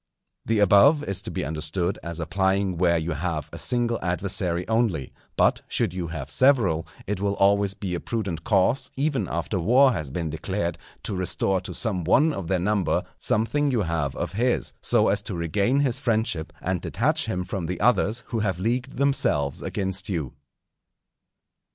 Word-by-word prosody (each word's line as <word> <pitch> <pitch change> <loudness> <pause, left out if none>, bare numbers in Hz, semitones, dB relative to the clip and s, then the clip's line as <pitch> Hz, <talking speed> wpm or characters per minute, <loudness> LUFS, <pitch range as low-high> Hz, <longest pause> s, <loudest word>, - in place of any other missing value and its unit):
The 115 - +2
above 105 - +5
is 100 -7 -2
to - - -6
be - - -3
understood 80 +4 -2
as 85 0 -5
applying 95 +1 0
where 85 -2 +3
you 80 +1 -2
have 80 0 -3
a - - -5
single 120 -2 0
adversary 90 -1 -1
only; 110 - 0 0.2
but - - +3
should 110 -7 0
you 90 -2 -3
have 80 0 -6
several, 110 - +3 0.2
it 105 -1 -2
will 100 0 0
always 100 0 +3
be 95 -3 -4
a 85 - -1
prudent 95 -8 -3
course, 105 +7 +2
even 140 0 0
after 95 - -2
war 125 +10 +5
has 75 -8 -4
been 80 +2 -3
declared, 85 +1 -3 0.2
to 100 - -3
restore 95 +1 0
to - - -7
some 100 -7 -1
one 150 - +4
of 95 -9 -5
their 95 - +1
number 100 +1 +1 0.2
something 130 +7 +2
you 120 -6 +1
have 80 -5 -2
of - - -4
his, 120 +4 0
so - - +2
as - - +2
to - - -5
regain 100 - +1
his 130 -5 +1
friendship 110 -9 -1
and 90 -1 -1
detach - - 0
him 90 0 -2
from 90 -2 -4
the 90 0 -4
others 115 0 +2
who 115 - -1
have 100 -4 0
leagued 120 +6 -2
themselves 75 - +1
against 95 -1 -3
you. 80 -9 -3
95 Hz, 175 wpm, -25 LUFS, 85-115 Hz, 0.2 s, above